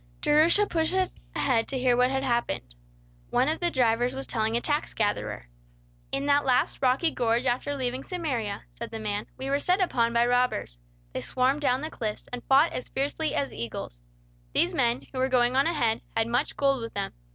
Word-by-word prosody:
Jerusha 330 +7 +4
pushed 330 -1 0 0.4
ahead 235 -4 +1
to 270 - -2
hear 250 -1 +3
what 250 +1 +3
had 265 0 -1
happened. 235 - -1 0.6
One 260 - +2
of 315 +1 0
the 345 - +1
drivers 245 -2 +1
was 270 - -4
telling 220 0 0
a - - +2
tax 295 +4 -1
gatherer. 205 - -2 0.6
"In 275 +1 -1
that 285 0 +3
last 255 -2 +1
rocky 270 +5 +3
gorge 235 0 0
after 255 +3 0
leaving 255 -1 -2
Samaria," 260 - -3
said 235 - -7
the 225 - -6
man, 210 -1 -3
"we 265 - -5
were 280 - +2
set 360 +6 +2
upon 235 -11 +2
by 235 0 +3
robbers. 245 - 0 0.3
They - - -3
swarmed 260 +3 +1
down 260 -2 +2
the 310 +1 -5
cliffs, 215 -3 -4
and 245 - -5
fought 280 +5 +4
as 250 - -5
fiercely 290 +3 -1
as 280 - -1
eagles. 110 - -6 0.5
These - - +3
men, 120 +4 +1
who 255 - -3
were 260 +1 +1
going 250 -1 +3
on 275 +4 +4
ahead, 235 -10 +1 0.2
had 225 - +3
much 235 +1 -1
gold 275 -2 +2
with 230 0 -7
them. 200 -1 -3
255 Hz, 195 wpm, -27 LUFS, 230-285 Hz, 0.6 s, Jerusha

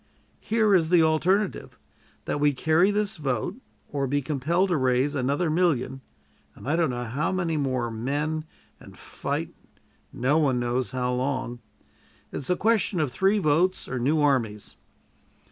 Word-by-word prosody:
Here 220 -2 +2
is 165 -4 +3
the 175 -2 +5
alternative: 180 +6 0 0.5
that - - -2
we 145 0 +3
carry 160 +7 +3
this 205 -1 -1
vote, 140 - -2 0.3
or 140 -2 -1
be 145 +2 +1
compelled 155 +7 0
to 175 - +2
raise 130 +2 +1
another 140 +5 0
million, 155 -6 0 0.5
and - - -11
I 150 - +2
don't 170 -3 +2
know 120 -1 -3
how 125 +9 -2
many 175 -4 -1
more, 130 -5 -1
men, 145 +7 -2 0.3
and - - -14
fight - - -4 0.6
no 140 +6 +1
one 135 -5 +2
knows 120 +1 -1
how 125 -1 -1
long. 130 -1 -2 0.7
It - - -5
is 140 - -5
a 180 - +3
question 215 -3 +1
of 150 -5 0
three 195 - +2
votes 180 +1 +1
or 130 - -3
new 145 +6 +1
armies." 115 -8 0
145 Hz, 160 wpm, -26 LUFS, 130-175 Hz, 0.7 s, the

